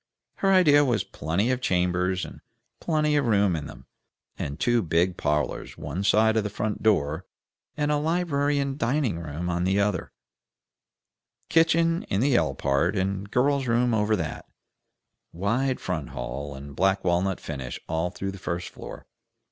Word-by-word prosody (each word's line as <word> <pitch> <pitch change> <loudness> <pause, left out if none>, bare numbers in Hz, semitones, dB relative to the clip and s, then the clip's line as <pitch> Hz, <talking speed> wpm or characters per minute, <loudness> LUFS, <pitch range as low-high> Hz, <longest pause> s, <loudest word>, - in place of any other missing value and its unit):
Her 195 - +2
idea 150 -6 +6
was 120 -7 +1
plenty 85 - -1
of 130 0 -1
chambers 90 -1 +1
and - - -11 0.4
plenty 155 -2 +1
of 140 -4 +1
room 100 -5 +3
in 75 -2 -4
them, - - -12 0.5
and 70 +2 -5
two 120 -1 +2
big 85 +1 +1
parlors 75 -2 -2
one 80 +7 -4
side 110 +2 +4
of 110 - +2
the 105 - -2
front 105 +1 -3
door, 85 -5 +1 0.5
and 150 0 +1
a 150 - +2
library 145 -2 +1
and 140 0 -2
dining 120 - 0
room 80 +2 -5
on 90 0 -1
the 95 +2 +2
other; 100 -3 0 1.4
kitchen 165 +1 +3
in 95 - +1
the 135 +2 +3
L - - +2
part, 75 +8 +1
and 95 +1 -2
girl's 135 +3 +1
room 120 +1 +2
over 110 0 +2
that; 80 -6 -5 0.8
wide 120 +9 0
front 80 -8 -3
hall, 65 +2 -5
and 70 +1 -10
black 95 +3 +2
walnut 90 +1 +1
finish 65 -5 -6
all 80 +2 -1
through 95 +2 -4
the 95 - -10
first 85 -1 -3
floor. - - -10
100 Hz, 165 wpm, -26 LUFS, 85-130 Hz, 1.4 s, idea